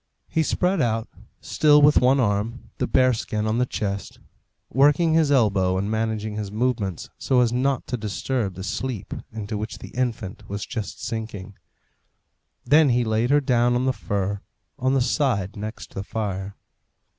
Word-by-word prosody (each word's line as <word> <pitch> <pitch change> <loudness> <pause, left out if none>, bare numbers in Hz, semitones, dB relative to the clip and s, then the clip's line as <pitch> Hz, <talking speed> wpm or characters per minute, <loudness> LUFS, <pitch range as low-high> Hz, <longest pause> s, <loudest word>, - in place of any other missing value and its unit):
He 160 - 0
spread 180 +3 +1
out, 115 -2 0 0.3
still 150 -1 +4
with 150 0 +6
one 130 +2 +4
arm, 110 +1 -1
the - - 0
bear 130 -1 +4
skin 110 -1 -2
on 110 +2 0
the 125 - +2
chest, 100 -4 -4 0.5
working 150 +4 +4
his 160 -3 +3
elbow 100 -8 +3
and 100 +3 -1
managing 110 -1 -2
his 105 -2 -4
movements 110 -5 -2
so 130 - +2
as 120 -1 +2
not 130 +1 0
to 125 - -3
disturb 110 -1 -2
the 95 - -7
sleep 110 +1 -4 0.2
into 110 -1 -4
which 110 +1 -5
the - - -10
infant 120 -6 -3
was 100 0 -4
just 110 -6 -6
sinking. 110 -3 -5 1.1
Then 145 +3 +5
he 120 0 +2
laid 110 +1 0
her 145 +1 +4
down 120 -2 +2
on 125 +1 +1
the 130 - +2
fur, 100 -3 -2 0.4
on 130 +1 +1
the 135 - +3
side 120 -7 0
next 110 +1 -7
the 95 - -4
fire. 100 -2 -4
115 Hz, 170 wpm, -24 LUFS, 105-130 Hz, 1.1 s, with